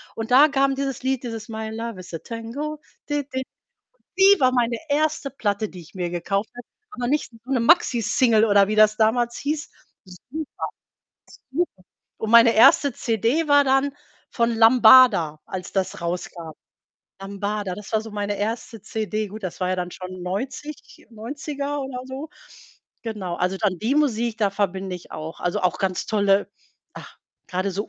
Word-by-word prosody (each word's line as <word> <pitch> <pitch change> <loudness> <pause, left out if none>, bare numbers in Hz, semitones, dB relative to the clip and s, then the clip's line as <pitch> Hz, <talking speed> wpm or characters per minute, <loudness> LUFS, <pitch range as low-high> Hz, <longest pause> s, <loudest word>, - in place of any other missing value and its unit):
und 225 +1 -5
da 280 +4 +8
kam 275 0 +2
dieses 270 -2 -3
Lied, 265 -1 -1
dieses 225 -2 -6
„My 220 0 -5
love 225 -2 -5
is 180 -1 -11
a 165 - -4
tango.“ 255 - -6 0.3
Di 290 -1 0
di. 260 - -1 0.6
Und - - -44
die 395 -1 +6
war 255 - +5
meine 240 -2 +1
1. 300 -1 0
Platte, 210 -4 -2
die 180 - -10
ich 160 - -16
mir 180 -2 -3
gekauft 195 +4 -2
habe. 245 - -10 0.3
Aber 245 -1 -4
nicht 295 -1 0
so 255 - -10
'ne 250 - +2
Maxi 255 -3 +4
Single, 220 +1 +3
oder 200 -1 +5
wie 215 - 0
das 215 0 +5
damals 235 +2 +1
hieß. 300 +1 -3 0.3
Super. 260 - -9 0.9
Super. 285 - -2 0.4
Und 220 - -3
meine 235 0 +7
1. 270 +4 +6
CD 235 +9 0
war 285 0 +6
dann 270 +1 +2 0.4
von 235 -1 +1
Lambada, 225 -9 +6
als 185 -1 -6
das 190 -1 -2
rauskam. 170 -1 -5 0.7
Lambada, 200 -1 -3
das 210 +2 -11
war 220 - +2
so 225 - -9
meine 205 0 -3
1. 225 0 -4
CD. 215 -1 -3
Gut, 215 +2 -10
das 185 - -5
war 185 0 0
ja 185 - 0
dann 180 0 -3
schon 185 0 -8
90 260 +10 -6
90er 285 +5 -5
oder 265 -2 -5
so. 270 +4 -7 0.7
Genau, 200 -6 -4
also 180 +2 -1
dann 195 -5 0
die 230 +8 0
Musik, 235 -6 +1
da 205 -2 +2
verbinde 190 -2 -2
ich 175 - -15
auch 160 +1 -7
also, 175 - -1
auch 180 - +1
ganz 190 -2 -1
tolle 200 -2 +2 0.4
ach, - - -11 0.3
grade 185 +2 -1
so 205 +3 -4
220 Hz, 175 wpm, -23 LUFS, 195-260 Hz, 0.9 s, da